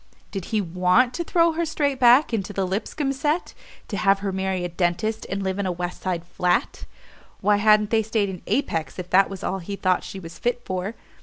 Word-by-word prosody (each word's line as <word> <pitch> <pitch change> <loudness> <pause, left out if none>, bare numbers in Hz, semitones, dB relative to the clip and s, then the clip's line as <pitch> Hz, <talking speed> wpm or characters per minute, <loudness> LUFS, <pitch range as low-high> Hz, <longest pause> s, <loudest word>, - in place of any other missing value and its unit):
Did 195 -3 -4
he 215 -2 0
want 185 +8 +2
to 340 - -2
throw 335 0 +3
her 330 +1 -1
straight 290 -4 -1
back 250 +2 +6
into 205 -2 -2
the 195 -1 0
Lipscomb 230 +9 -2
set, 295 +5 -1 0.3
to 205 - -4
have 195 -1 +4
her 200 -1 -1
marry 190 -1 -1
a - - 0
dentist 175 +6 -1
and 195 +1 -2
live 190 +1 -2
in 200 - 0
a - - 0
West 175 0 -5
Side 175 -3 -2
flat? 175 0 -1 0.5
Why 205 +1 +3
hadn't 210 0 +4
they 225 -1 +4
stayed 215 -1 0
in 185 -2 -7
Apex, 165 - -1
if 180 -1 -7
that 195 +1 +5
was 195 -2 -7
all 195 - -2
he 200 +3 -5
thought 185 -2 +1
she 195 - -7
was 170 -2 -10
fit 245 0 -1
for? 185 +4 -3
195 Hz, 220 wpm, -24 LUFS, 185-235 Hz, 0.5 s, back